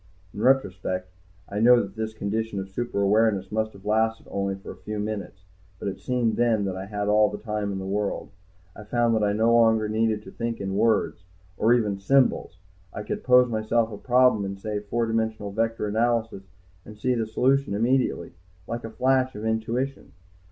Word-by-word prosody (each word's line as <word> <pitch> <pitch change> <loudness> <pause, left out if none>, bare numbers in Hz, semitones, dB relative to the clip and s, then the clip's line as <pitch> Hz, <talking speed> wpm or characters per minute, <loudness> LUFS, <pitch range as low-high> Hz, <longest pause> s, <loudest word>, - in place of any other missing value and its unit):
In 105 - -6
retrospect 95 -7 +1 0.4
I 100 - -4
know 120 +2 +6
that 100 -3 -4
this 110 0 -3
condition 110 0 -3
of 95 - -5
super 100 -1 -2
awareness 100 -2 +2
must 110 0 -1
have 100 0 -16
lasted 110 +1 +1
only 100 0 -1
for 95 - -10
a - - -10
few 105 0 -6
minutes. 105 -3 -5 0.3
But 100 - -3
it 95 - -7
seemed 125 -3 0
then 115 -4 +2
that 95 -1 -3
I 95 +1 -6
had 105 0 -3
all 105 0 +4
the - - -6
time 105 -2 -3
in 95 - -3
the 95 - -5
world. 100 +1 -2 0.4
I 105 - -10
found 120 +2 +1
that 110 -1 +1
I 100 0 +2
no 110 +2 +3
longer 110 -2 +4
needed 110 0 0
to - - -11
think 115 -1 -4
in 95 -1 -3
words, 105 -4 +1 0.3
or 110 +5 +2
even 105 -5 0
symbols. 125 -5 +2 0.3
I 105 - -6
could - - -4
pose 125 0 +6
myself 115 0 0
a 105 - -6
problem 125 -4 +3
in, 100 0 -4
say, 105 +1 -3
four 115 +3 -2
dimensional 110 -2 -2
vector 115 +1 -1
analysis 110 -2 -1 0.4
and 105 +3 -12
see 125 +4 0
the 115 -2 -1
solution 130 -1 +1
immediately, 120 -6 0 0.3
like 115 0 -5
a 115 - -5
flash 130 +3 +1
of 105 +1 -6
intuition. 115 +5 -2
110 Hz, 195 wpm, -25 LUFS, 100-115 Hz, 0.4 s, know